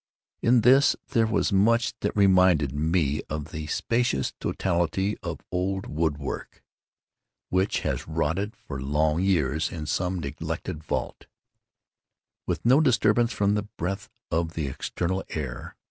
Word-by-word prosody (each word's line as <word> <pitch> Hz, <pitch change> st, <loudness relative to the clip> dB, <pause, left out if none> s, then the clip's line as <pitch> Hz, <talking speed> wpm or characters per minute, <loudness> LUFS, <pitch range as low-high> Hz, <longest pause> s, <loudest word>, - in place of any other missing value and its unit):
In 120 Hz, 0 st, +4 dB
this 130 Hz, +4 st, +6 dB
there 115 Hz, -1 st, +2 dB
was 110 Hz, -2 st, +1 dB
much 115 Hz, +4 st, +3 dB
that -, -, -2 dB
reminded 90 Hz, -8 st, +4 dB
me 75 Hz, -1 st, +1 dB
of 75 Hz, 0 st, -4 dB
the 75 Hz, 0 st, -5 dB
specious 115 Hz, -, 0 dB
totality 95 Hz, +3 st, 0 dB
of -, -, -5 dB
old 95 Hz, +2 st, -1 dB
wood 75 Hz, -1 st, -1 dB
work 70 Hz, -, -6 dB, 0.9 s
which 95 Hz, +2 st, +1 dB
has -, -, -2 dB
rotted 80 Hz, +6 st, -1 dB
for 65 Hz, -2 st, -7 dB
long 75 Hz, +4 st, +1 dB
years 80 Hz, -5 st, +1 dB
in 80 Hz, -2 st, -5 dB
some 90 Hz, +4 st, -1 dB
neglected 75 Hz, 0 st, -5 dB
vault, -, -, -4 dB, 1.2 s
with -, -, -2 dB
no 130 Hz, +6 st, +6 dB
disturbance 120 Hz, -3 st, +3 dB
from 100 Hz, -2 st, +1 dB
the 105 Hz, 0 st, -1 dB
breath 95 Hz, +3 st, -3 dB, 0.2 s
of 80 Hz, 0 st, 0 dB
the 80 Hz, -, -1 dB
external 90 Hz, +7 st, -2 dB
air. 65 Hz, -5 st, -5 dB
90 Hz, 135 wpm, -26 LUFS, 75-105 Hz, 1.2 s, this